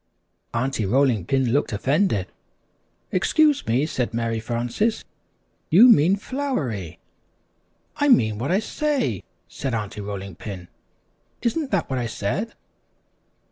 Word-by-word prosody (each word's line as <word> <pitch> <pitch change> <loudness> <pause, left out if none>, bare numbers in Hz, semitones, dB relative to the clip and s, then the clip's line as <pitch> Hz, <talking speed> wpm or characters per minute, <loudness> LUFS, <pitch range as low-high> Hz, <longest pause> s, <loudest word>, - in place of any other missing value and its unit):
Aunty 125 0 -1
Rolling 120 -2 +2
Pin 130 -3 +1
looked 145 - +1
offended. 130 - +1 0.9
"Excuse 295 - +2
me," 125 +6 +2
said 125 -7 -2
Mary 115 -1 -1
Frances, 120 - -1 0.6
"you 210 +9 +8
mean 180 -3 +6
'flowery.'" 145 - -3 1.0
"I 290 - +2
mean 110 - +4
what 135 +7 -2
I 185 - +4
say," 220 - -1 0.3
said 115 +9 -4
Aunty 105 -1 -4
Rolling 100 -1 -6
Pin; 90 0 -8 0.7
"isn't 280 +5 0
that 195 -5 0
what 130 -1 -2
I 120 - -2
said?" 150 - -3
130 Hz, 120 wpm, -23 LUFS, -, 1.0 s, you